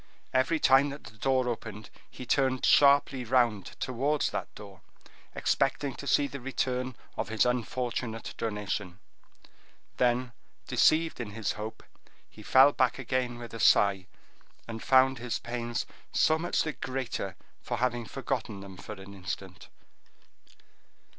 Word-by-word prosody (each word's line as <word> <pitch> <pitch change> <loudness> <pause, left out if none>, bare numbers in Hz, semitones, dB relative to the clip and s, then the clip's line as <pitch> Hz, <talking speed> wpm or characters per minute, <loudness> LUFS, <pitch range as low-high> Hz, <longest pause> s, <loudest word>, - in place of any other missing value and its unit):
Every 130 +5 +2
time 135 +1 +5
that 140 +1 -8
the 115 -2 -13
door 130 +2 +1
opened, 110 -3 -5 0.2
he 125 - -9
turned 130 0 +1
sharply 140 -2 +5
round 120 -5 +1
towards 140 +4 0
that - - -3
door, 100 -3 -12 0.5
expecting 140 -2 0
to 140 - -7
see 145 - +3
the 140 0 -6
return 130 -1 -2 0.2
of - - -2
his 110 +1 +2
unfortunate 120 -1 -2
donation; 105 -4 -3 1.0
then, 125 0 +1 0.3
deceived 160 -1 +3
in 110 -4 -5
his 110 -1 -2
hope, 110 +1 -7 0.4
he 110 - -15
fell 130 +6 +6
back 130 -4 +1
again 130 -1 -2
with 120 -1 -9
a 115 - -6
sigh, 100 -3 +4 0.6
and 115 -1 -6
found 130 -1 +4
his 120 -1 -2
pains 120 0 -3 0.3
so 155 0 +3
much 175 +1 0
the 155 - -3
greater 125 -6 -4 0.3
for - - -3
having 120 -2 -1
forgotten 100 +1 -4
them 95 -1 -10
for 105 - -8
an 95 0 -11
instant. 95 0 -7
125 Hz, 140 wpm, -29 LUFS, 110-130 Hz, 1.0 s, fell